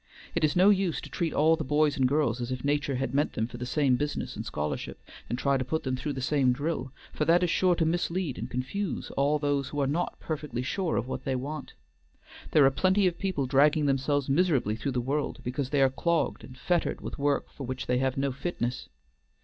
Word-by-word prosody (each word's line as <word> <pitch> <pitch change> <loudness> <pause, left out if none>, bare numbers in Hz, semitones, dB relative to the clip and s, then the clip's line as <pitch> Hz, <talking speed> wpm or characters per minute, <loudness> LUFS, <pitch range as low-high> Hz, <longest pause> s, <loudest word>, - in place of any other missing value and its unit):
It 170 - -1
is 150 -1 +3
no 185 +3 +6
use 190 -4 +1
to - - -10
treat 165 -2 -1
all 160 +3 +4
the - - -4
boys 150 +1 +2
and 130 -2 +3
girls 130 -4 +1
as 120 +1 -3
if 125 -1 -4
nature 145 -1 0
had 135 0 -2
meant 145 +2 +1
them 110 - -1
for 120 +1 -8
the 125 +1 -5
same 130 -1 +2
business 145 +1 -3
and - - -4
scholarship, 75 0 -4 0.3
and 120 - -1
try 140 +1 +2
to 130 - -1
put 160 +5 -2
them 130 -1 -1
through 145 +3 -3
the 130 - -5
same 135 -3 +3
drill, 140 -1 -3 0.2
for - - -1
that 175 +3 +4
is 175 - +2
sure 180 0 +3
to 165 - +1
mislead 170 -2 -1
and 120 - -4
confuse 135 +11 -3
all 140 +2 +2
those 145 -2 0
who 145 - -4
are 140 - +2
not 160 +6 -2
perfectly 150 -6 -4
sure 175 +6 -1
of 120 - -1
what 130 -1 -4
they 135 - -1
want. 140 +3 -5 0.8
There 150 -3 +5
are 135 - +5
plenty 190 +7 +2
of 175 -2 0
people 185 -9 -1
dragging 145 +3 +4
themselves 140 0 +1
miserably 140 - +2
through 125 +4 -3
the 125 - 0
world, 140 +4 -2
because 130 +2 -2
they 140 -1 +3
are 135 - +4
clogged 170 +4 0
and 130 - -11
fettered 175 +4 0
with - - -6
work 145 0 0
for 135 - -7
which 130 0 -4
they 125 0 +1
have 130 +1 0
no 135 0 0
fitness. 130 -3 -3
140 Hz, 235 wpm, -28 LUFS, 130-160 Hz, 0.8 s, no